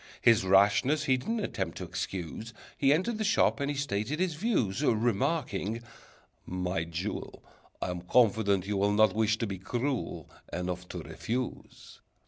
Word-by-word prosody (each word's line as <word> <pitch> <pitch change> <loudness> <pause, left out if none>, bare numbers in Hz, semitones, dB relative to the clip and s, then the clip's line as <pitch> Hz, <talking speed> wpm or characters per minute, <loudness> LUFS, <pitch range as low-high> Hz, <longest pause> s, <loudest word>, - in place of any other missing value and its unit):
His 115 -4 +5
rashness 100 +10 +4
he 130 -3 +3
didn't 225 - -2
attempt 95 - -3
to - - -5
excuse, 90 +5 -5 0.2
He 135 -1 +3
entered 215 +9 +1
the - - +1
shop 215 -5 +3
and 140 0 -1
he 145 - -2
stated 135 +2 -1
his 185 -2 +1
views. 150 - 0
Remarking, 115 - 0 0.6
"My 90 -2 -2
jewel, 85 +5 -5 0.4
I'm 90 -1 -3
confident 100 -2 +3
you 100 0 -1
will 100 +1 +2
Not 110 +1 +5
wish 110 0 +2
to 115 - -1
be 100 -3 -5
cruel 125 +6 -3 0.2
Enough 90 0 -3
to - - -6
refuse. 125 +2 -5
110 Hz, 150 wpm, -30 LUFS, 95-140 Hz, 0.6 s, His